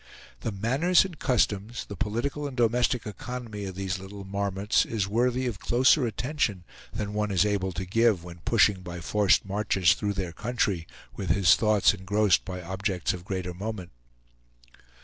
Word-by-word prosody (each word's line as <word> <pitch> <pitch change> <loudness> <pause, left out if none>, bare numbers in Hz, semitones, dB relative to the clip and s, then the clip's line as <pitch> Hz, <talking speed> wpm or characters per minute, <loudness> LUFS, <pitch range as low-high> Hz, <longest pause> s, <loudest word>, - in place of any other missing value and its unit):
The 115 - -3
manners 135 - +3
and 175 -6 -9
customs, 115 -1 0
the 100 - -8
political 120 - -2
and 135 -2 -8
domestic 120 +1 +2
economy 110 -1 -6
of 95 -1 -6
these 95 -1 -3
little 100 +1 -9
marmots 100 +1 0
is 105 -4 -2
worthy 125 +4 +1
of 120 -6 -3
closer 130 +2 +3
attention 115 - -2 0.3
than 105 -2 -4
one 105 0 -1
is 95 0 +3
able 100 -2 0
to 95 +2 -4
give 105 -2 +2
when 85 -1 -10
pushing 105 0 +3
by 90 -1 -7
forced 100 +4 +2
marches 95 -3 +2
through 100 +1 -2
their 95 -3 -4
country, 105 -6 -1 0.3
with - - -5
his 95 -4 +5
thoughts 105 -2 +3
engrossed 100 0 +2
by 90 -2 -6
objects 95 +1 -2
of 90 -1 -8
greater 95 -2 -3
moment. 100 -1 -6
105 Hz, 165 wpm, -27 LUFS, 95-115 Hz, 0.3 s, his